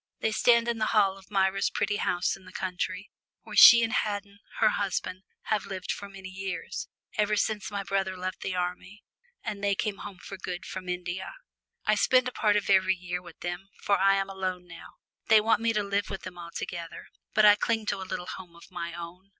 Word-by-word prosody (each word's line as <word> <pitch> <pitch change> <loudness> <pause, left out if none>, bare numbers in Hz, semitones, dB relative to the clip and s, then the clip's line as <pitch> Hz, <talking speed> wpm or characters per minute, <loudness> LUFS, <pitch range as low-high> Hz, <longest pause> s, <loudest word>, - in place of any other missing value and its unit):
They 220 - 0
stand 235 +2 +4
in 235 -1 -1
the 215 - 0
hall 195 -2 +4
of 195 0 -16
Myra's 195 -1 +2
pretty 205 - 0
house 175 -2 0
in 190 - -16
the 185 - -12
country, 185 0 -4 0.3
where - - -9
she 235 -1 +10
and 225 +1 0
Haddon, 205 -3 -2 0.2
her - - +5
husband, 185 -2 -2 0.2
have 215 -2 -1
lived 185 -2 -4
for 200 - -6
many 195 -1 -9
years, 190 0 -5 0.3
ever 210 0 +3
since 205 -2 -1
my 200 -1 -3
brother 195 -1 -1
left 185 0 -4
the 190 - -3
army 180 +3 -4 0.4
and 205 -3 -5
they 200 -1 +2
came 205 -1 -2
home 205 -2 -8
for 195 +2 -9
good 180 -1 -5
from 185 -1 -6
India. 180 - -4 0.5
I 215 - +4
spend 255 +4 +4
a - - -2
part 210 -4 +2
of 205 - 0
every 190 -1 +4
year 180 0 -4
with 175 -2 -14
them, 175 +2 -5
for 200 -2 +2
I 195 +1 +5
am 195 0 0
alone 185 -2 -4
now. 170 -1 -12 0.3
They 220 -1 +7
want 220 0 +2
me 230 0 +2
to 210 -2 0
live 200 0 -1
with 195 - -6
them 180 -1 -8
altogether, 170 0 -6 0.3
but 215 - +6
I 205 - +10
cling 220 +1 0
to 195 - -2
a 190 - -7
little 180 - -3
home 180 -2 -9
of 170 - -16
my 170 -1 -5
own. 175 +3 -9
195 Hz, 215 wpm, -28 LUFS, 180-205 Hz, 0.5 s, she